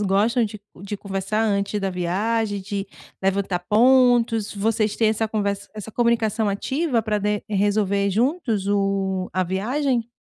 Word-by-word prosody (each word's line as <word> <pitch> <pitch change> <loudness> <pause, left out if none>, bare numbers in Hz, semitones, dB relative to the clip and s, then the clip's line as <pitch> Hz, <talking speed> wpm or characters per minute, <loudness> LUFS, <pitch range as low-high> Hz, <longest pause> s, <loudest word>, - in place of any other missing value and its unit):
gostam 210 +5 +2
de 215 0 -6 0.2
de 200 +1 -5
conversar 195 +2 -2
antes 200 -1 0
da 195 -1 -1
viagem, 205 +4 -1
de 200 +1 -4 0.4
levantar 195 -1 0
pontos, 235 -2 +4
vocês 215 +1 0
têm 225 - +3
essa 220 0 0
conver 200 -2 -1 0.2
essa 215 +1 -8
comunicação 230 -2 +1
ativa 255 +4 0
pra 215 -1 0
de 210 0 -1
resolver 200 -1 +1
juntos 230 - 0
o 195 -2 0
a 185 0 +1
viagem? 235 +6 -1
210 Hz, 140 wpm, -23 LUFS, 195-225 Hz, 0.4 s, pontos